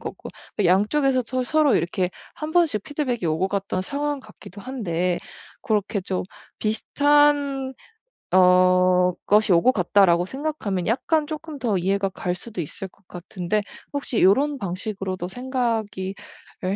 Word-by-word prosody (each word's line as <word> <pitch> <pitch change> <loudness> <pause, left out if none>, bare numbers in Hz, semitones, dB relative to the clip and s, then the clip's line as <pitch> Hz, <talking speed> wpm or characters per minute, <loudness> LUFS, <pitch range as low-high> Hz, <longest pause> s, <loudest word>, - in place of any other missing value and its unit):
거고 - - -7 0.3
그 205 - +1
양쪽에서 255 +9 +3
서 255 +1 -1
서로 305 0 +3
이렇게 175 +2 -1 0.2
1 305 0 -5
번씩 320 - +2
피드백이 255 - -2
오고 160 +4 0
갔던 195 -2 -2
상황 290 +6 -2
같기도 210 -3 -13
한데 180 -8 -2 0.4
고렇게 210 0 0
좀 185 0 -3 0.4
'비슷한 285 +3 +2 0.6
어 180 0 +5
것이 210 0 +4
오고 170 +9 +5
갔다.'라고 180 -4 +3
생각하면 265 - -3
약간 300 +7 +1
쪼끔 310 0 -6
더 230 -6 0
이해가 195 +2 0
갈 180 -1 -3
수도 195 0 -6
있을 180 +5 -6
것 180 - -31
같은데 180 +3 -3 0.3
혹시 275 -5 -1
요런 275 +10 +4
방식으로도 190 -2 -4
생각이 230 -5 -2 0.5
을 185 +2 0
210 Hz, 285 characters per minute, -23 LUFS, 185-270 Hz, 0.6 s, 어